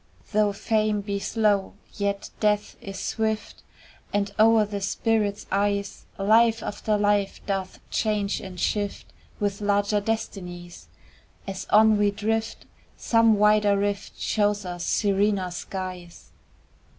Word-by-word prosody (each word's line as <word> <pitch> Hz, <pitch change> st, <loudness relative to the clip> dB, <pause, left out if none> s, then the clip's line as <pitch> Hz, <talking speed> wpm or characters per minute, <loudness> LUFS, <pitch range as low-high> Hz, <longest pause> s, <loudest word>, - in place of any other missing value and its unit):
Though 210 Hz, -1 st, +3 dB
Fame 215 Hz, 0 st, 0 dB
be 200 Hz, 0 st, -3 dB
slow, 205 Hz, -2 st, +1 dB, 0.2 s
yet 200 Hz, -1 st, -2 dB
Death 210 Hz, -1 st, +1 dB
is 195 Hz, -1 st, -7 dB
swift, 220 Hz, +2 st, -2 dB, 0.5 s
And, 200 Hz, 0 st, -1 dB
o'er 220 Hz, 0 st, +6 dB
the 205 Hz, -1 st, -5 dB
spirit's 210 Hz, 0 st, 0 dB
eyes, 200 Hz, 0 st, -1 dB
Life 225 Hz, +3 st, +4 dB
after 210 Hz, +1 st, -1 dB
life 205 Hz, -1 st, +1 dB
doth 195 Hz, -2 st, -3 dB
change 210 Hz, -2 st, 0 dB
and 185 Hz, -2 st, -8 dB
shift 205 Hz, +1 st, -2 dB, 0.3 s
With 205 Hz, 0 st, -2 dB
larger 205 Hz, 0 st, +1 dB
destinies: 180 Hz, -5 st, -5 dB, 0.6 s
As 190 Hz, -1 st, -5 dB
on 215 Hz, 0 st, +5 dB
we 205 Hz, 0 st, +4 dB
drift, 220 Hz, +2 st, -2 dB, 0.3 s
some 230 Hz, -1 st, +4 dB
wider 210 Hz, -1 st, +4 dB
rift 200 Hz, 0 st, -2 dB
Shows 205 Hz, -2 st, 0 dB
us 175 Hz, -1 st, -5 dB
serener 200 Hz, -2 st, +1 dB
skies. 180 Hz, -1 st, -7 dB
205 Hz, 120 wpm, -25 LUFS, 200-215 Hz, 0.6 s, o'er